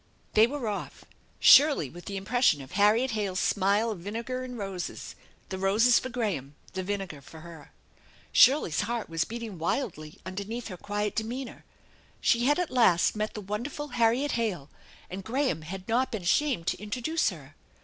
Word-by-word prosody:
They 220 +2 +6
were 270 -2 -4
off, 205 -1 -5 0.3
Shirley 285 - +7
with 175 +6 -12
the 200 - -4
impression 195 - +2
of 130 - -14
Harriet 210 +6 +3
Hale's 200 -4 -2
smile 205 +3 +2
of 205 - -6
vinegar 230 +7 -4
and 250 -1 -7
roses; 195 -4 -5 0.4
the 190 - -4
roses 220 +5 +4
for 255 - -6
Graham, 200 - -3 0.2
the 190 - -2
vinegar 190 -6 -4
for 160 +3 -13
her. 165 -3 -12 0.6
Shirley's 255 - +5
heart 230 0 -3
was 165 -1 0
beating 225 -5 -7
wildly 160 - -3
under 185 +2 -4
neath 230 +3 -6
her 185 - -6
quiet 205 +2 -3
demeanor. 235 +3 -5 0.5
She 235 +1 +2
had 290 +2 +3
at 360 -2 -1
last 220 -9 +4
met 215 0 -3
the 210 - -5
wonderful 240 +9 -5
Harriet 240 +4 +2
Hale, 195 -12 -2 0.4
and 190 +2 -7
Graham 255 - -1
had 185 +4 -8
not 245 +3 +1
been 215 -5 -4
ashamed 220 - +1
to - - 0
intro 210 +4 -5
duce 320 0 +1
her! 155 -6 -11
210 Hz, 175 wpm, -28 LUFS, 185-240 Hz, 0.6 s, Shirley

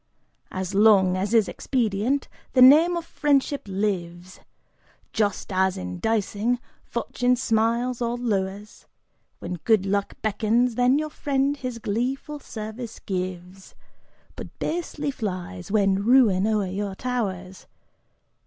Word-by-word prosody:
As 185 0 -4
long 195 -3 +5
as 195 +3 -2
is 225 -3 +4
expedient, 245 +2 -1 0.3
the 255 - +4
name 320 +7 +7
of 335 - -5
friendship 285 -2 +1
lives, 185 -3 -3 0.7
Just 205 -2 -1
as 190 0 +1
in 90 0 -6
dicing, 220 +2 0 0.3
Fortune 245 +1 0
smiles 235 +1 0
or 235 0 -1
lowers; 205 -3 -3 0.5
When 180 - -5
good 215 -4 +3
luck 200 0 -1
beckons, 225 +3 +1
then 250 +3 +3
your 305 0 -2
friend 280 -1 0
his 255 -4 -5
gleeful 255 +7 -3
service 220 -1 -7
gives 185 0 -6 0.6
But - - -9
basely 310 -3 -3
flies 185 - -5
when 200 -2 +2
ruin 215 -5 +4
o'er 215 -2 +1
you 195 +1 -4
towers. 190 -7 -4
220 Hz, 120 wpm, -24 LUFS, 190-250 Hz, 0.7 s, name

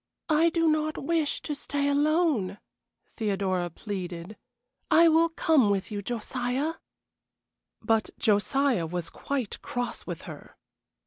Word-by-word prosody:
"I 320 +2 +4
do 330 0 +1
not 310 0 +1
wish 320 0 -1
to 300 - -3
stay 285 0 -2
alone," 285 - +2 0.6
Theodora 195 -5 0
pleaded. 180 0 -6 0.5
"I 335 +1 +7
will 330 +1 +4
come 315 -8 +3
with 200 +1 -1
you, 205 -1 -3
Josiah." 245 +7 -2 1.1
But 225 -1 +2
Josiah 215 -1 +2
was 175 0 -4
quite 265 -7 -3
cross 245 0 -4
with - - -5
her. - - -11
250 Hz, 120 wpm, -27 LUFS, 200-310 Hz, 1.1 s, I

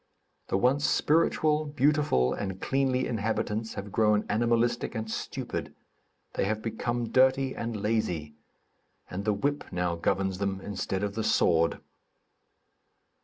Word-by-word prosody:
The - - +1
once 130 +7 +2
spiritual, 155 -1 +2
beautiful 145 - +2
and 95 -2 -4
cleanly 130 0 +1
inhabitants 110 0 -2
have 100 0 -6
grown 105 -1 +3
animalistic 120 +2 +1
and 110 0 -3
stupid; - - -4 0.6
they - - 0
have 110 +2 -2
become 120 +1 -2
dirty 130 +1 +3
and 115 -2 -3
lazy; 90 -8 -1 0.8
and 100 +3 -4
the 105 - +2
whip 145 +8 -1
now 90 -1 0
governs 95 +2 0
them, 100 -1 -1
instead 95 0 -3
of 100 -1 -1
the 110 +1 -2
sword. 85 -5 +2
110 Hz, 125 wpm, -28 LUFS, 95-130 Hz, 0.8 s, grown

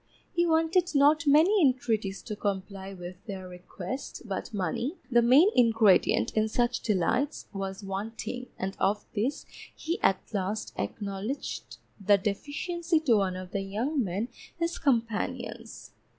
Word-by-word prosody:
He 345 -1 +2
wanted 325 +1 +2
not 295 +3 +4
many 335 +8 +5
intreaties 220 -8 +1
to 210 - -5
comply 195 -1 -3
with 180 -1 -9
their 190 -3 -6
request, 180 +7 -7
but 195 -4 -4
money, 210 - -2 0.2
the 240 0 +6
main 265 - +6
ingredient 225 -5 +4
in 215 0 +2
such 240 +2 +1
delights, 230 - 0
was 195 0 -4
wanting, 225 +5 -5
and 195 +1 -3
of 205 +2 +1
this 235 +7 -1 0.3
he 330 +3 -3
at 195 - +3
last 205 +2 -2
acknowledged 205 +6 -4 0.3
the 205 +1 +6
deficiency 315 - -1
to 245 -8 +4
one 190 -2 0
of 185 0 -7
the 200 - -1
young 235 +9 -1
men 200 +5 -2 0.3
his 335 0 -2
companions. 235 -1 -2
220 Hz, 135 wpm, -28 LUFS, 195-280 Hz, 0.3 s, the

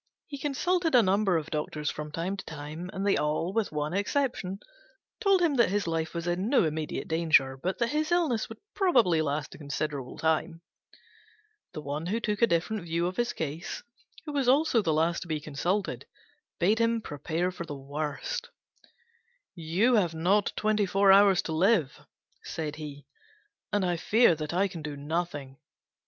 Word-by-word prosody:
He 280 - -8
consulted 325 +3 +1
a 240 - +7
number 195 -1 +2
of 155 - -5
doctors 150 -1 -2
from 150 0 -6
time 170 +5 -2
to 195 - -7
time, 155 +3 -7
and 195 +1 -3
they 200 - +3
all, 155 +4 -1
with 225 -1 0
one 150 +1 -2
exception, 200 -2 -1 0.6
told 395 -4 +3
him 325 -4 +3
that 235 - +4
his 205 +1 0
life 165 0 -2
was 170 0 -3
in 180 +4 -1
no 275 - +4
immediate 155 0 -3
danger, 160 -5 +3
but 180 +8 -3
that 235 -1 0
his 310 +3 -1
illness 315 -11 +1
would 225 - -9 0.2
probably 225 - +3
last 150 0 -2
a - - -12
considerable 145 -2 -4
time. 160 +1 0 1.1
The 155 - -6
one 150 +3 -4
who 215 +5 0
took 210 -3 -2
a 235 - +6
different 185 +4 0
view 170 0 -1
of 180 +1 -2
his 240 0 +1
case, 160 +2 -5 0.4
who 300 - -5
was 275 -3 0
also 275 -3 +4
the 165 - 0
last 165 +2 +1
to 175 - -8
be 155 -2 -1
consulted, 170 +7 -2 0.5
bade 205 +6 +2
him 230 0 +2
prepare 165 +4 -2
for 170 -2 -7
the 145 - -5
worst: 150 - -4 1.0
"You 175 +9 +1
have 175 -5 +1
not 190 +6 +2
twenty 215 -1 +1
four 195 +1 +4
hours 195 -1 +6
to - - -4
live," 170 - +1 0.4
said 155 -2 -4
he, 145 -2 -8 0.7
"and 205 -2 +1
I 175 -1 0
fear 210 +2 +4 0.2
I 190 +3 +2
can 175 -4 -8
do 150 -1 -6
nothing." 145 -3 -3
175 Hz, 175 wpm, -28 LUFS, 155-215 Hz, 1.1 s, a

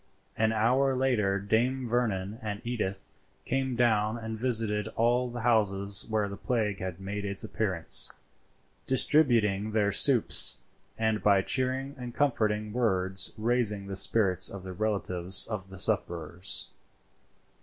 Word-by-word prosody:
An 110 0 +1
hour 125 +5 +1
later 115 -7 0
Dame 120 +6 -1
Vernon 110 -3 -2
and 105 -2 -5
Edith 105 -5 -4 0.3
came 130 -1 -2
down 110 -2 +1
and 110 -1 -6
visited 110 -3 -1
all 120 +2 +1
the 120 0 -7
houses 100 -4 +1
where 110 -2 0
the 100 - -7
plague 105 -4 -2
had 95 -3 -6
made 100 +1 -6
its 100 +2 -2
appearance, 95 -6 -1 0.8
distributing 115 -8 +2
their 105 -2 +1
soups, 105 - +5 0.4
and 110 -1 -1
by 100 -2 +3
cheering 130 +3 -2
and 120 -1 -8
comforting 110 -6 -1
words 95 -5 +2
raising 110 -3 -1
the 100 0 -6
spirits 95 -2 +2
of 100 -2 -9
the 95 -1 -8
relatives 95 -3 +1
of 105 -4 -6
the 95 - -10
sufferers. 85 0 +1
110 Hz, 135 wpm, -28 LUFS, 100-120 Hz, 0.8 s, soups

